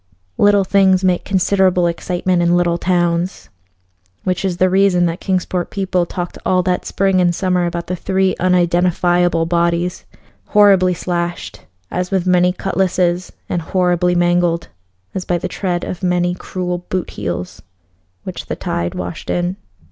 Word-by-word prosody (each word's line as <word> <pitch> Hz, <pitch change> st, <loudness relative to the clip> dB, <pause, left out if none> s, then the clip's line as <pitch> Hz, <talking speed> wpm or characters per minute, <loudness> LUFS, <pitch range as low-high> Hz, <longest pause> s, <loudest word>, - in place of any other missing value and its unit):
Little 205 Hz, -1 st, +5 dB
things 190 Hz, -1 st, +3 dB
make 180 Hz, -1 st, +1 dB
considerable 190 Hz, -1 st, +2 dB
excitement 175 Hz, +1 st, 0 dB
in 175 Hz, 0 st, +3 dB
little 175 Hz, -1 st, +1 dB
towns, 175 Hz, 0 st, 0 dB, 0.7 s
which 185 Hz, 0 st, -1 dB
is 185 Hz, -3 st, -1 dB
the 185 Hz, -, +3 dB
reason 185 Hz, -1 st, +3 dB
that 170 Hz, +1 st, -2 dB
Kingsport 180 Hz, -2 st, -1 dB
people 185 Hz, -3 st, -1 dB
talked 175 Hz, -1 st, -5 dB
all 185 Hz, -1 st, +2 dB
that 180 Hz, -1 st, -1 dB
spring 195 Hz, -1 st, +1 dB
and 175 Hz, -1 st, +2 dB
summer 180 Hz, -2 st, +1 dB
about 170 Hz, 0 st, -4 dB
the 180 Hz, -, -3 dB
three 190 Hz, +1 st, 0 dB
unidentifiable 175 Hz, -1 st, +2 dB
bodies, 170 Hz, +1 st, 0 dB, 0.4 s
horribly 195 Hz, -3 st, +4 dB
slashed 170 Hz, -, -4 dB, 0.2 s
as 180 Hz, 0 st, -2 dB
with 190 Hz, -3 st, 0 dB
many 180 Hz, 0 st, +3 dB
cutlasses, 185 Hz, -1 st, 0 dB, 0.2 s
and 175 Hz, -, -2 dB
horribly 180 Hz, 0 st, +1 dB
mangled 175 Hz, -1 st, +1 dB, 0.4 s
as 190 Hz, -, -3 dB
by 175 Hz, -, 0 dB
the 180 Hz, -, -3 dB
tread 180 Hz, -2 st, -2 dB
of 180 Hz, -, -5 dB
many 180 Hz, -1 st, +1 dB
cruel 180 Hz, 0 st, -4 dB
boot 180 Hz, +1 st, -4 dB
heels, 85 Hz, +1 st, -5 dB, 0.6 s
which -, -, -7 dB
the -, -, -3 dB
tide 85 Hz, 0 st, -3 dB
washed 90 Hz, -1 st, -6 dB
in. 175 Hz, +1 st, -1 dB
180 Hz, 150 wpm, -18 LUFS, 175-185 Hz, 0.7 s, Little